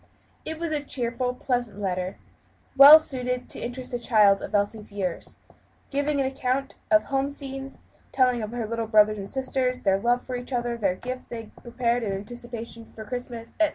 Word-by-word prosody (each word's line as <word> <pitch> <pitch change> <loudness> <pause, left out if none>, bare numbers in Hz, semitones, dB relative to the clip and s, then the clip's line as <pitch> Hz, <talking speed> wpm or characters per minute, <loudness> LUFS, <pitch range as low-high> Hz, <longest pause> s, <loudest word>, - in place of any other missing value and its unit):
It 315 - -3
was 335 0 -3
a 300 -1 0
cheerful, 250 -2 -2
pleasant 245 -5 -2
letter, 185 -1 -2 0.6
well 280 +3 +12
suited 250 -5 -2
to - - -5
interest 250 +1 -5
a 245 - -1
child 210 -4 +4
of 210 - -4
Elsie's 205 +1 -1
years; 190 -4 -4 0.5
giving 285 +1 0
an 270 - +2
account 265 +1 -1 0.2
of 320 -1 +5
home 275 0 -1
scenes; 270 -1 -7 0.3
telling 250 -3 +3
of 215 - -4
her 235 0 -3
little 230 +1 -3
brothers 215 -1 +4
and 195 0 -6
sisters, 260 -1 -1
their 195 0 +3
love 240 +3 +1
for 255 - -4
each 245 +2 -6
other; 240 -1 -1
the 220 -4 0
little 185 0 -2
gifts 255 0 -5
they 235 -1 -6
had 215 - -16
prepared 240 0 -1
in 205 -4 -2
anticipation 230 +2 -7
of 220 - -7
Christmas, 245 -1 -6
etc. 320 -1 +4
245 Hz, 190 wpm, -26 LUFS, 215-265 Hz, 0.6 s, well